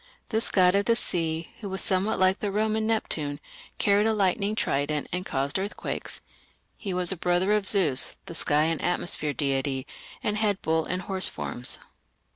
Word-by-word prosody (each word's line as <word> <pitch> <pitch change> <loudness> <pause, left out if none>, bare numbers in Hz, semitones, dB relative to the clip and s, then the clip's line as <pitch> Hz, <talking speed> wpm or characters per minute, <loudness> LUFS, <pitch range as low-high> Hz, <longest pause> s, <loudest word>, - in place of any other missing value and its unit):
This 220 -1 +2
god 180 -2 +4
of 200 0 +2
the 230 - +3
sea, 165 -6 -2
who 200 -4 -6
is - - +3
somewhat 195 +3 +1
like 185 +1 +3
the 205 - -2
Roman 215 +2 0
Neptune, 150 -10 -2 0.4
carried 205 +1 +3
a 220 - +2
lightning 200 +1 +1
trident 145 -5 -1
and 180 +1 -3
caused 140 +6 -1
earthquakes. 200 +2 -5 0.5
He 200 - -5
was 180 0 +4
a - - -1
brother 180 +3 +1
of 210 -2 +1
Zeus, 155 -11 +2
the - - -8
sky 150 -2 +2
and 160 0 0
atmosphere 175 -4 0
deity, 135 -1 -1 0.4
and 210 0 0
had 205 -3 +1
bull 160 0 +1
and 180 0 -2
horse 190 0 +3
forms. 120 0 -5
185 Hz, 175 wpm, -26 LUFS, 155-205 Hz, 0.5 s, god